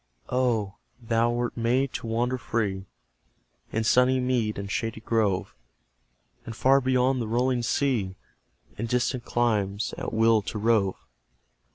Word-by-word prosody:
Oh, 115 -6 0 0.2
thou 115 0 +1
wert 120 0 -2
made 125 +3 +1
to - - -5
wander 120 +3 0
free 100 -5 -2 0.8
In 110 - -1
sunny 125 +3 +4
mead 125 -4 0
and 100 0 -5
shady 115 -1 -2
grove, 110 -4 0 0.9
And 115 - -7
far 135 +3 +4
beyond 130 0 +2
the 115 - -3
rolling 125 +2 +1
sea, 115 -7 0 0.6
In 115 - -2
distant 125 +1 -1
climes, 105 -3 0
at - - -4
will 110 0 +4
to 105 - -5
rove! 105 -3 +2
115 Hz, 135 wpm, -26 LUFS, 110-125 Hz, 0.9 s, sunny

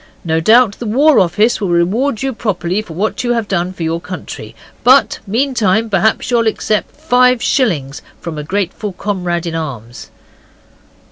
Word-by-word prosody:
No 160 -1 +1
doubt 220 +4 +4
the 235 - -5
War 285 +7 +4
Office 210 +7 +2
will 195 - -1
reward 210 +10 0
you 270 -1 -1
properly 205 -4 -2
for 185 -6 -11
what 210 +7 -2
you 240 0 +1
have 230 -3 -2
done 180 -2 -1
for 180 -2 -7
your 165 +1 -2
country. 150 - -8 0.3
But 260 +3 +4
meantime, 225 -2 +1
perhaps, 215 +5 +1
you'll 230 -2 +2
accept 215 -1 -1
five 250 -5 +3
shillings 165 - 0 0.2
from 165 -3 -6
a - - -5
grateful 195 +4 -3
comrade 180 -3 -3
in 170 - -3
arms. 125 -8 -6
205 Hz, 160 wpm, -15 LUFS, 170-235 Hz, 0.3 s, doubt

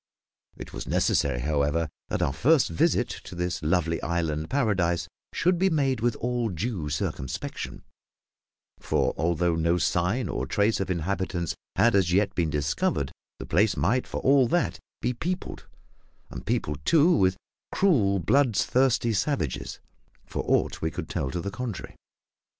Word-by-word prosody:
It - - -9
was - - -6
necessary, - - +1
however, 75 +3 +1 0.2
that - - -1
our 70 - 0
first 150 - +3
visit 80 - +2 0.2
to - - -9
this 90 0 -2
lovely 85 +1 +1
island 80 -2 -1
paradise 95 - +1 0.2
should 175 0 +1
be 190 +1 +4
made 135 -7 +1
with 120 0 +1
all 120 -1 -1
due 90 -3 -3
circumspection; 65 -3 -4 1.0
for - - 0
although 85 +2 +1
no 85 +2 +2
sign 90 +8 0
or - - -3
trace 105 +1 +1
of 95 - -2
inhabitants 90 0 -1 0.2
had 115 +5 +4
as 95 -3 +3
yet 100 +1 +2
been 85 -4 0
discovered, 75 -1 0 0.3
the - - -7
place 100 +2 +2
might 120 +9 +1
for - - -4
all 135 -2 +5
that 175 +8 0 0.2
be 125 - +1
peopled, 180 +9 -4 0.6
and - - -8
peopled, 75 0 -1
too, 165 - +5
with 95 -4 +2 0.3
cruel, 115 - +3
bloodthirsty 120 - +2
savages, 105 - -2 0.5
for - - -4
aught - - +1
we 80 - 0
could - - -6
tell 65 - -2
to 85 +4 -3
the 100 - -4
contrary. 115 -1 -6
95 Hz, 150 wpm, -26 LUFS, 80-125 Hz, 1.0 s, all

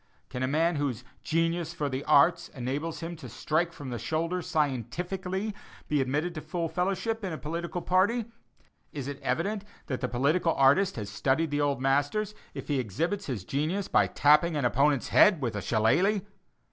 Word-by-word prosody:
Can 125 - -5
a 130 - +1
man 160 +4 +1
whose 130 -5 -2 0.2
"genius 165 +1 0
for 150 -3 -1
the 130 0 -3
arts" 140 - +4
enables 140 +7 -4
him 170 +1 -5
to 155 - -9
strike 165 +2 0
from 145 -5 -8
the 120 - -4
shoulder 165 - -1
scientifically, 180 - -2 0.3
be 150 -2 +1
admitted 150 +7 -1
to 155 - -6
full 170 0 -3
fellowship 195 +6 -1
in 190 - -2
a 160 - -4
political 170 +3 -4
party? 205 +6 +2 0.7
Is 140 -3 -5
it 140 -1 -6
evident 200 +4 -1 0.2
that 130 -4 -4
the 125 - -1
political 155 +7 +1
artist 145 +9 +4
has 105 -3 -5
studied 140 +9 0
the 145 0 0
old 140 -2 +1
masters, 145 +11 +1 0.2
if - - -6
he 145 -3 0
exhibits 165 - -2
his 120 -9 -3
genius 160 +8 -1
by - - +3
tapping 150 +3 +4
an 145 -4 0
opponent's 140 +2 +2
head 205 -6 +6
with 120 -6 -2
a 105 - -2
shillelagh? 160 - +2
155 Hz, 180 wpm, -28 LUFS, 135-180 Hz, 0.7 s, head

